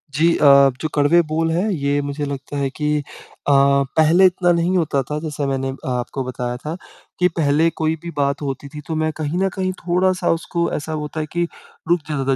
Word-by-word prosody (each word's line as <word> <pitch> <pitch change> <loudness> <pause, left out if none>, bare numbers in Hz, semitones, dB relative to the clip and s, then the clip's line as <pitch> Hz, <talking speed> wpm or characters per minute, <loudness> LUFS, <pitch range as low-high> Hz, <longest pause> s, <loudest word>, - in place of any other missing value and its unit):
जी 165 +2 +3
अ, - - -1 0.4
जो 155 - 0
कड़वे 145 +4 +4
बोल 165 +1 0
हैं 185 +6 0
ये 145 -5 0
मुझे 145 +1 -3
लगता 140 0 -5
है 140 -1 0
कि 150 +1 -1
अ, - - -6 0.5
पहले 140 +5 +4
इतना 180 -1 +3
नहीं 175 +2 +1
होता 150 -5 +1
था 150 0 -2
जैसे 150 -2 -4
मैंने 135 -1 -1
अ, 135 - -8
आपको 125 +1 -2
बताया 125 -1 -4
था 155 +5 -5 0.4
कि 180 - +5
पहले 155 +2 +3
कोई 160 +1 +1
भी 170 - -5
बात 140 +1 0
होती 140 0 -4
थी, 150 +1 -9
तो 160 - -2
मैं 155 0 0
कहीं 155 +3 -2
न 195 - +2
कहीं 185 -1 -1
थोड़ा-सा 180 +1 +1
उसको 170 +1 -1
ऐसा 155 +1 -4
होता 150 +1 -4
है 155 - -1
कि 175 0 0 0.5
रुक 175 0 +4
जाता 135 -2 0
150 Hz, 210 wpm, -20 LUFS, 140-170 Hz, 0.5 s, कि